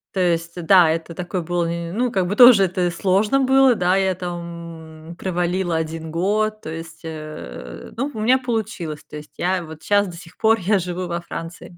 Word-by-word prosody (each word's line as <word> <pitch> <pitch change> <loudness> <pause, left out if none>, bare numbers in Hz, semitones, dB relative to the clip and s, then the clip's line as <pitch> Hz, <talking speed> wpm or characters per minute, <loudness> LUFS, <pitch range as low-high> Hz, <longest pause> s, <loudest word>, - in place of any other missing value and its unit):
То 190 - +1
есть, 170 -1 0
да, 180 -2 +6
это 165 +1 -2
такой 180 +1 -4
был, 175 +1 -1
ни 170 0 -3
ни - - -7
ну, 245 +6 0
как 190 -5 0
бы 205 +3 -3
тоже 240 -5 +9
это 180 -1 0
сложно 195 +8 +1
было, 265 -1 +5
да, 180 -1 +2
я 190 -1 +1
там, 170 -3 -8
м, 170 - -8
провалила 180 -1 -1
1 160 0 -3
год, 215 +6 0
то - - -7
есть, 165 0 -8
э, 155 - -8
ну, 270 +5 -1
у 220 - -6
меня 250 +4 +4
получилось, 220 - -4
то - - -10
есть 150 0 -12
я 185 +1 0
вот 160 -1 -11
щас 205 0 +2
до 175 - -8
сих 165 +1 -13
пор 225 0 +3
я 200 +2 +2
живу 180 0 -4
во 170 0 -2
Франции. 170 0 -8
175 Hz, 210 wpm, -21 LUFS, 165-200 Hz, -, тоже